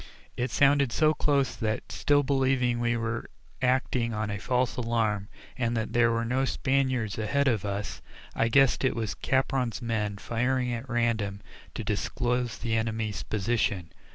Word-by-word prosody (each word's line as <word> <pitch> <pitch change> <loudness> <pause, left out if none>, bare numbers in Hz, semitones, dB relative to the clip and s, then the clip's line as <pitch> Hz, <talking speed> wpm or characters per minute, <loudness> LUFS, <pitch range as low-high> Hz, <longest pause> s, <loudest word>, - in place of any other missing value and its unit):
It 125 +1 -1
sounded 140 0 +3
so 155 +5 +3
close 140 -4 +1
that 110 -1 -3
still 145 0 +2
believing 130 -3 +1
we 120 0 +1
were 115 +1 -3 0.3
acting 125 -2 +1
on 105 0 -2
a 105 - -3
false 125 +3 0
alarm, 115 -4 0 0.3
and 120 -2 -1
that 110 0 -3
there 120 -1 +4
were 115 0 0
no 130 +3 +1
Spaniards 130 -6 0
ahead 140 +6 +1
of 110 -6 +1
us 100 +1 -4 0.3
I - - +1
guessed 135 +3 +4
it 130 - +2
was 110 -2 -2
Capron's 130 -3 0
men 110 -4 -2
firing 125 +3 0
at 120 +3 -5
random 115 -5 0 0.3
to - - -3
disclose 125 -1 -1
the 115 -2 -1
enemy's 110 -1 -1
position. 100 -5 -1
120 Hz, 155 wpm, -28 LUFS, 110-130 Hz, 0.3 s, there